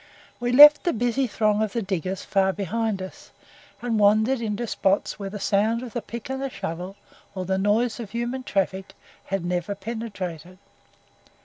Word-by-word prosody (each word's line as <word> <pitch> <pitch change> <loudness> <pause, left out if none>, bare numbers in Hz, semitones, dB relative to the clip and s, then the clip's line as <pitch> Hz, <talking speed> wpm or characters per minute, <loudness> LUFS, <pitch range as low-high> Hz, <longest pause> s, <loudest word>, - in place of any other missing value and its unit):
We 245 0 -1
left 295 +3 +9
the 345 - +1
busy 245 +3 0
throng 215 -1 +1
of 215 -2 -1
the 235 - -1
diggers 190 -1 -3
far 190 -1 +2
behind 205 0 -2
us, 185 - -11 0.5
and 230 -3 0
wandered 215 +5 +3
into 220 +1 -2
spots 200 -1 0
where 200 -1 -4
the 205 +1 -7
sound 220 +4 +1
of 245 - -8
the 240 - -2
pick 230 +2 -8
and 265 0 -3
shovel, 190 -1 -5 0.4
or 185 -1 -3
the 190 +1 0
noise 220 +5 +1
of 225 -4 -6
human 240 +3 -3
traffic, 195 -4 -2 0.3
had 195 -3 -3
never 180 +3 -2
penetrated. 190 -5 -6
210 Hz, 170 wpm, -24 LUFS, 190-235 Hz, 0.5 s, left